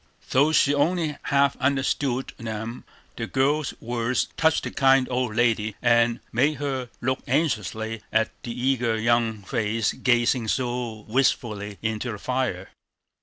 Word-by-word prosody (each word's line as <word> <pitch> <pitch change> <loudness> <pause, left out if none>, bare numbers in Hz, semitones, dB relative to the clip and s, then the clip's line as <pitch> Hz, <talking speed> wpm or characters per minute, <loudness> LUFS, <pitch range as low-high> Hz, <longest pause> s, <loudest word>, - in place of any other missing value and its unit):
Though 140 +4 +4
she 145 -2 +4
only 155 +1 +1
half 140 -1 +3
understood 135 -1 0
them, 115 +1 -5 0.3
the 115 - -3
girl's 140 +3 +1
words 120 +1 -1
touched 160 -1 +2
the - - -4
kind 135 -1 +4
old 125 -3 -1
lady, 110 -3 +1
and 120 0 +3
made 140 +6 +2
her 135 -3 -3
look 130 +1 0
anxiously 110 - -1
at 110 +1 +2
the - - -7
eager 120 -3 +1
young 115 -2 +1
face 110 0 0
gazing 120 -1 +2
so 120 -3 -2
wistfully 110 -4 0
into 110 +2 -2
the 105 - -5
fire. 120 -5 -2
120 Hz, 135 wpm, -25 LUFS, 110-135 Hz, 0.3 s, Though